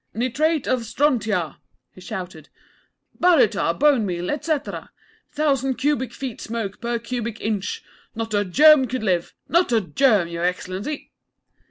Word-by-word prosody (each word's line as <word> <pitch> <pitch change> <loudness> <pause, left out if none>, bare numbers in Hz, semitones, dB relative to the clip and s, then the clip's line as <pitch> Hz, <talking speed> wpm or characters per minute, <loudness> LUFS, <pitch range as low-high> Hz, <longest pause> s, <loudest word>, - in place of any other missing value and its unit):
'Nitrate 290 +6 0
of 255 - +2
strontia,' 225 - 0 0.4
he 185 - -14
shouted; 180 -4 -7 0.7
'baryta, 220 - +3
bone 285 -5 +4
meal, 180 -2 -2
etcetera! 300 0 -3 0.4
Thousand 275 -3 0
cubic 275 -2 0
feet 260 -4 -6
smoke 220 -3 -5
per 235 0 -1
cubic 235 -1 -4
inch. 210 -3 -3 0.3
Not 225 -1 -4
a 205 0 +2
germ 275 - +6
could 250 0 -3
live 180 -4 0
not 345 -4 +2
a 230 - +4
germ, 210 -2 +2
Y' 170 0 -6
Excellency!' 185 - -3
230 Hz, 135 wpm, -22 LUFS, 190-275 Hz, 0.7 s, germ